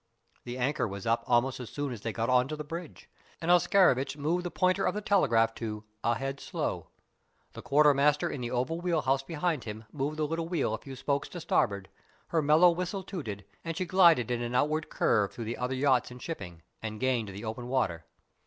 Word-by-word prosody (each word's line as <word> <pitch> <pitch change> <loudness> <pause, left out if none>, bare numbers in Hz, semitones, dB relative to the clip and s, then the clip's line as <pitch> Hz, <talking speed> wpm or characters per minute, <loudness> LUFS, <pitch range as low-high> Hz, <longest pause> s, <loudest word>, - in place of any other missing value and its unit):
The 120 +1 -5
anchor 130 +2 0
was 100 -1 -7
up 115 +1 +1
almost 125 +2 +2
as 125 - -7
soon 145 -3 -3
as 110 - -8
they 115 - -2
got 115 +1 -2
on 125 0 +3
to 155 - -4
the 150 - -6
bridge, 165 +2 -8 0.3
and 170 +1 +1
Oscarovitch 175 -7 +4
moved 165 +5 0
the 175 - -3
pointer 185 +2 +1
of 190 - +1
the - - -1
telegraph 115 - +3
to 105 -2 -4 0.2
"Ahead 135 +4 -1
slow." - - -3 0.7
The - - -8
quartermaster 145 0 +4
in 135 - -4
the 120 - -3
oval 130 +8 -1
wheel 170 -3 0
house 135 +1 +2
behind 155 -2 -2
him 110 0 -6
moved 145 +2 -3
the 155 - +1
little 165 +2 -3
wheel 160 -10 0
a 110 - -3
few 135 +2 -9
spokes 140 +2 -1
to 175 - -7
starboard, 100 - 0 0.4
her 165 - +2
mellow 155 +4 +6
whistle 180 +3 -3
tooted, 110 - -6 0.2
and 165 -1 -4
she 185 - -1
glided 170 - +5
in 120 -1 -1
an 120 +1 -3
outward 155 +4 +1
curve 105 -3 +2
through 115 - -6
the 115 +2 -4
other 125 +1 -1
yachts 130 -1 +2
and 125 0 -10
shipping, 90 - -7 0.2
and 110 -1 -5
gained 125 -4 +1
the 100 +3 -7
open 115 +3 -5
water. 100 -11 -1
135 Hz, 210 wpm, -29 LUFS, 120-165 Hz, 0.7 s, mellow